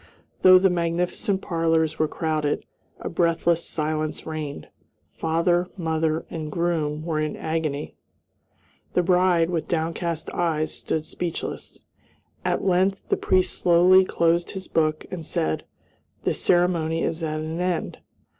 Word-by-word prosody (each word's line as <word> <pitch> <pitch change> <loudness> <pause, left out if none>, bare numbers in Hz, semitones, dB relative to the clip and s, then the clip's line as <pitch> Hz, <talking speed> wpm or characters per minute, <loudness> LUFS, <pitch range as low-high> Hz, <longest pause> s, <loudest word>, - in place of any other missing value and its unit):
Though 185 0 +9
the 190 0 +4
magnificent 180 +4 -1
parlors 165 -2 +1
were 155 - +3
crowded, 155 -2 -1 0.4
a - - -4
breathless 170 0 +1
silence 155 0 -2
reigned. 155 -3 -5 0.5
Father, 170 +2 +1
mother, 160 -2 0
and 155 -2 -5
groom 160 -3 -1
were 160 -2 -1
in 155 -1 -1
agony. 155 -2 -2 1.0
The 180 - +3
bride, 180 -1 +3
with 165 -3 -2
downcast 165 0 -2
eyes, 160 -3 0
stood 155 -1 -3
speechless. 170 +1 -5 0.7
At - - 0
length 190 +1 +1
the - - +3
priest 185 -1 +1
slowly 180 +2 +6
closed 170 -1 +1
his 190 -1 -6
book 155 -1 0
and 180 -3 -5
said, 80 - -1 0.6
"The - - +1
ceremony 170 -2 +2
is 165 +1 -2
at 155 -1 -2
an 160 +2 -4
end." 180 -2 -2
165 Hz, 130 wpm, -24 LUFS, 155-175 Hz, 1.0 s, Though